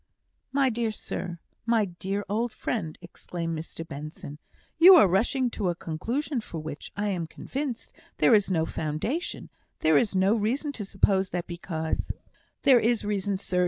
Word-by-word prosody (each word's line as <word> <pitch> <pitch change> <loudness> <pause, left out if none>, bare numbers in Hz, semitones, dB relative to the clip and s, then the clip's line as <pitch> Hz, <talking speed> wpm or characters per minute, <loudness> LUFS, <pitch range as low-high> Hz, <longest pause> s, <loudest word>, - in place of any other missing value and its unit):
"My 270 -1 +3
dear 230 0 0
sir 180 -4 -4 0.3
my 230 -2 +3
dear 195 +3 -4
old 225 +4 0
friend!" 165 -11 -3
exclaimed 170 -1 -5
Mr 165 +1 -7
Benson, 150 0 -8 0.4
"you 365 +3 +11
are 265 - +8
rushing 240 +7 +1
to 200 -5 -1
a 175 - -1
conclusion 235 - -2
for 170 - -8
which, 155 -1 -7
I 205 0 0
am 175 -4 -2
convinced, 265 - -5 0.2
there - - +5
is 205 -3 +4
no 165 -4 +2
foundation; 165 - -3 0.3
there 155 -2 +5
is 205 -4 0
no 190 +2 +4
reason 240 +7 0
to 220 -7 -5
suppose 195 -1 +2
that 175 -1 -3
because 170 -2 -3 0.2
" - - -38
"There 260 -3 +7
is 230 -1 +1
reason, 200 -1 -1
sir. 185 -1 -1
195 Hz, 165 wpm, -27 LUFS, 170-235 Hz, 0.4 s, you